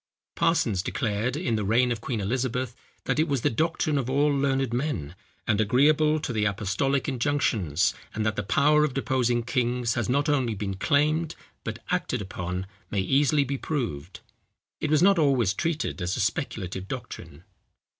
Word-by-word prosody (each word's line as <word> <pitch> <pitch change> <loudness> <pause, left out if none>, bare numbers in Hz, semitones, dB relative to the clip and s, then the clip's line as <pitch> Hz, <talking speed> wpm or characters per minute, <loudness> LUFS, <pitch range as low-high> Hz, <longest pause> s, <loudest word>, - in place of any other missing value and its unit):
Parsons 115 - +1
declared, 110 +7 -1
in 150 -9 0
the 105 - -1
reign 120 +5 +3
of 115 -2 -2
Queen 120 -2 -3
Elizabeth, 125 +3 -2 0.3
that - - -1
it 160 - +3
was 140 -4 0
the 145 - +2
doctrine 155 +2 0
of 130 -2 -3
all 145 +2 +2
learned 135 -3 0
men, 120 - -2 0.3
and 110 0 +2
agreeable 150 +7 +3
to 135 - -3
the 110 -2 0
apostolic 105 +8 0
injunctions; 110 - +1 0.2
and 110 -1 -1
that 110 -1 0
the - - -1
power 150 +8 +3
of 145 -4 -1
deposing 125 -3 +1
kings 120 -1 0
has 120 -3 -2
not 140 +4 +2
only 130 -7 +1
been 100 -1 -3
claimed, 155 - +1 0.3
but 115 +1 -6
acted 175 -8 0
upon, 90 -1 -4 0.2
may 100 - -1
easily 140 +8 +3
be 140 0 -3
proved. 95 - -4 0.6
It 155 - -2
was 155 +2 +4
not 195 -2 +5
always 130 -10 +3
treated 155 - -2
as 90 +2 -1
a - - -3
speculative 95 - -2
doctrine. 75 -4 -8
125 Hz, 170 wpm, -26 LUFS, 105-145 Hz, 0.6 s, not